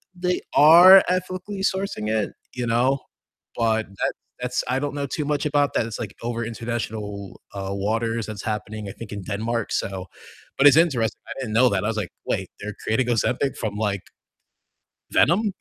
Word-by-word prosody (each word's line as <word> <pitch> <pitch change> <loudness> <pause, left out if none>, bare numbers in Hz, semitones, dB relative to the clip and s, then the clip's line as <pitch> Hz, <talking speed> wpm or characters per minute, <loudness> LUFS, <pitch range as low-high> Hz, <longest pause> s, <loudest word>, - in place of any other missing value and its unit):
they 180 0 -1
are 175 +6 +9
ethically 185 +2 -2
sourcing 190 - -1
it, 110 -1 0 0.2
you 125 -1 -2
know, 125 +4 +2 0.6
but 110 -1 +1
that's - - -1 0.2
that's 125 0 -1
I 125 +1 0
don't 145 0 -3
know 140 - -2
too 150 +3 -3
much 145 0 -1
about 145 -1 +2
that. 115 - +2
It's 115 - -6
like 105 -4 -6
over 115 0 -2
international, 110 -4 -5
uh, 95 -1 -5
waters 115 +3 -1
that's 105 -2 -6
happening, 105 -1 -4
I - - -7
think 115 -3 -10
in 100 -1 -5
Denmark, 110 +3 -2
so. 95 -1 -3 0.5
But 135 - +3
it's 140 - +7
interesting. 135 -10 +2
I - - -5
didn't 120 -5 -4
know 125 +3 +5
that. 100 -2 0
I - - +1
was 115 -1 -2
like, 105 -5 -2 0.2
"Wait, - - -2
they're 105 +1 -5
creating 115 +4 +1
Ozempic 120 +3 0
from, 105 -2 -3
like, 105 -3 -1 1.1
venom 195 - +3
115 Hz, 180 wpm, -23 LUFS, 105-145 Hz, 1.1 s, are